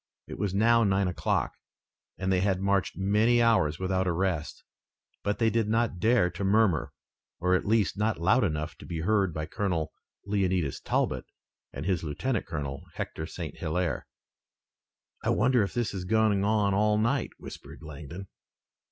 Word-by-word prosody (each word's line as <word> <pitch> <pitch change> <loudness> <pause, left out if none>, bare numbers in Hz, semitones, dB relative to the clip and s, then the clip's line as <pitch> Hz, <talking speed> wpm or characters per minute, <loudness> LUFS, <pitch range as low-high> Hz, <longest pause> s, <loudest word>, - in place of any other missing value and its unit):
It - - -9
was 100 -1 0
now 115 +4 +4
nine 100 -2 +2
o'clock, 90 - -1 0.6
and 95 0 -1
they 95 - +3
had 95 -1 +1
marched 100 0 0
many 105 +5 +3
hours 110 -10 +3
without 95 0 0
a - - +2
rest, 85 -3 -2 0.6
but 100 0 -1
they 115 0 +2
did 115 -2 +1
not 115 -4 +1
dare 110 -3 +3
to 100 - -5
murmur, 100 -4 +2 0.5
at 90 +2 +1
least 105 -2 +2
not 110 -2 0
loud 105 +9 +3
enough 75 -5 -2
to - - -10
be 80 -2 -4
heard 100 0 +2
by 80 -1 -4
Colonel 80 -2 -2 0.3
Leonidas 95 -7 0
Talbot - - -1 0.5
and - - -6
his 90 -3 0
lieutenant 100 - -2
colonel, 70 -4 -4
Hector 80 - -4
St. 80 -2 -7
Hilaire. 85 -3 -2 1.2
"I - - 0
wonder 125 +2 +3
if 100 - -2
this 120 -4 -1
is 95 -2 -4
going 110 -1 +2
on 105 -1 +2
all 105 +1 +3
night," 120 +4 +1
whispered - - -11
Langdon. 80 +5 -8
95 Hz, 160 wpm, -28 LUFS, 85-110 Hz, 1.2 s, now